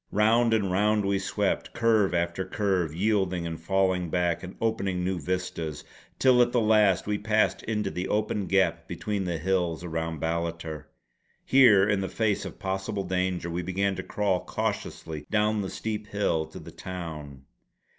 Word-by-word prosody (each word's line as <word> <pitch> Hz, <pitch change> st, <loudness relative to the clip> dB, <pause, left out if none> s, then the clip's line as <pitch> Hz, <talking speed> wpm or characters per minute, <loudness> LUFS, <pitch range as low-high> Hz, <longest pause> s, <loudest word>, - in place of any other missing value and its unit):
Round 115 Hz, +3 st, +3 dB
and 105 Hz, -4 st, +1 dB
round 105 Hz, +2 st, +2 dB
we 100 Hz, 0 st, +1 dB
swept, 95 Hz, -, -1 dB
curve 110 Hz, -4 st, +3 dB
after 85 Hz, +2 st, 0 dB
curve 95 Hz, -6 st, 0 dB
yielding 95 Hz, -3 st, +1 dB
and 80 Hz, -1 st, -5 dB
falling 95 Hz, 0 st, +1 dB
back 85 Hz, 0 st, 0 dB
and 95 Hz, 0 st, -8 dB
opening 100 Hz, -5 st, -1 dB
new 95 Hz, 0 st, -1 dB
vistas; 80 Hz, -2 st, -3 dB, 0.3 s
till 130 Hz, -2 st, +5 dB
at 120 Hz, 0 st, +3 dB
the 120 Hz, -, +2 dB
last 105 Hz, -4 st, +4 dB
we 105 Hz, 0 st, -1 dB
passed 110 Hz, +1 st, +1 dB
into 105 Hz, -3 st, -2 dB
the 90 Hz, +1 st, -3 dB
open 105 Hz, -2 st, -1 dB
gap 85 Hz, -3 st, +1 dB
between 100 Hz, +2 st, -3 dB
the 85 Hz, -2 st, -1 dB
hills 85 Hz, -1 st, 0 dB
around 80 Hz, -1 st, -3 dB
Ballater. 80 Hz, -1 st, -3 dB, 0.6 s
Here 110 Hz, -7 st, +6 dB
in 105 Hz, -1 st, +1 dB
the 95 Hz, -, -3 dB
face 110 Hz, -3 st, 0 dB
of -, -, -8 dB
possible 95 Hz, +1 st, -3 dB
danger 90 Hz, -2 st, -1 dB
we 85 Hz, +2 st, -2 dB
began 95 Hz, +2 st, -1 dB
to -, -, -2 dB
crawl 100 Hz, -3 st, -1 dB
cautiously 75 Hz, -2 st, -4 dB
down 105 Hz, 0 st, +2 dB
the 95 Hz, -, -3 dB
steep 110 Hz, -1 st, -4 dB
hill 85 Hz, -7 st, 0 dB
to 80 Hz, -, -11 dB
the -, -, -10 dB
town. 75 Hz, -7 st, -7 dB
95 Hz, 165 wpm, -27 LUFS, 85-105 Hz, 0.6 s, Here